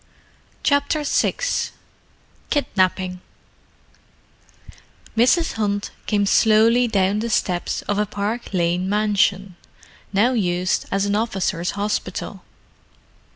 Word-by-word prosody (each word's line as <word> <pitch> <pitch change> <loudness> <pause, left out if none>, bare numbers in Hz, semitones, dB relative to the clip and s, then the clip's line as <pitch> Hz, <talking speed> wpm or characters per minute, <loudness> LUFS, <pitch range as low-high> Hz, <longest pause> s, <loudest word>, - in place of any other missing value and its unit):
CHAPTER 285 +1 +1
VI 290 - +1 1.1
KIDNAPPING 185 - 0 1.9
Mrs. 255 +9 +3
Hunt 205 -2 -2 0.2
came 205 -2 +2
slowly 225 +4 +4
down 200 -1 +1
the 230 +2 -2
steps 180 -5 -1
of 205 0 -1
a 210 - +1
Park 210 +4 -4
Lane 180 0 0
mansion, 200 -3 +1 0.5
now 215 +6 +3
used 180 -4 0
as 195 0 +1
an 205 0 0
officers' 195 -5 -1
hospital. 205 +1 -3
205 Hz, 95 wpm, -21 LUFS, 190-225 Hz, 1.9 s, slowly